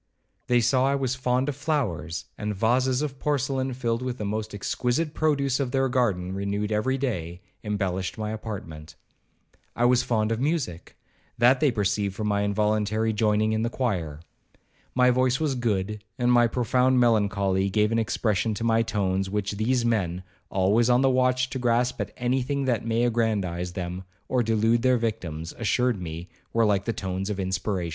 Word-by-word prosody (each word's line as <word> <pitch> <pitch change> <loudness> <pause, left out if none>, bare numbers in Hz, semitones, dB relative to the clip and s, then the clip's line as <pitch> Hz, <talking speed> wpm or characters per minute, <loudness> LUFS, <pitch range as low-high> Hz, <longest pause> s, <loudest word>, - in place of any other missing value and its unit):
They 120 -1 +3
saw 130 +3 +3
I 140 - +2
was 130 -2 -1
fond 130 +1 0
of 145 - -2
flowers, 125 - -2
and 105 -1 -3
vases 125 +6 +2
of 135 -3 -5
porcelain, 135 -2 0
filled 115 -2 -1
with 125 -1 -3
the 105 - -4
most 110 +1 -3
exquisite 125 - -1
produce 140 -4 +1
of 135 -3 -1
their 135 +1 +1
garden, 100 -8 0
(renewed 100 +2 -2
every 130 +6 +1
day), 90 -11 -3 0.2
embellished 95 -3 -2
my 105 -1 -3
apartment. 95 -8 -7 0.8
I 120 - +2
was 125 0 +4
fond 110 -3 0
of 115 - -1
music,—that 130 - -1
they 150 - +4
perceived 100 -3 -1
from 110 - -3
my 100 0 +1
involuntary 105 +1 +1
joining 110 0 +2
in 110 - 0
the 115 - 0
choir. 90 - -2 0.7
My 125 0 +5
voice 130 +1 +2
was 155 -3 0
good, 105 -4 -2
and 125 -1 +2
my 120 -1 +5
profound 125 +2 +2
melancholy 100 -4 +2
gave 105 +2 +2
an 115 - +2
expression 110 -2 0
to 110 - -4
my 115 0 +3
tones, 95 -4 -1
which 105 0 -2
these 115 +4 0
men, 95 -6 0 0.3
always 100 +5 +2
on 125 +1 +4
the 135 -1 +4
watch 130 0 +2
to 130 - -3
grasp 120 +1 +1
at - - -4
any 125 +2 0
thing 140 +2 -2
that 120 -4 0
may 115 +1 0
aggrandize 100 -7 0
them, 90 0 -5 0.2
or 125 - +1
delude 115 +1 +2
their 130 0 +3
victims, 85 -8 -4
assured 115 -1 +1
me 85 0 -6 0.3
were 115 0 +3
like 100 -2 +1
the 115 - 0
tones 95 -3 -4
of 100 -2 -3
inspiration. 95 -1 -2
115 Hz, 175 wpm, -26 LUFS, 100-125 Hz, 0.8 s, My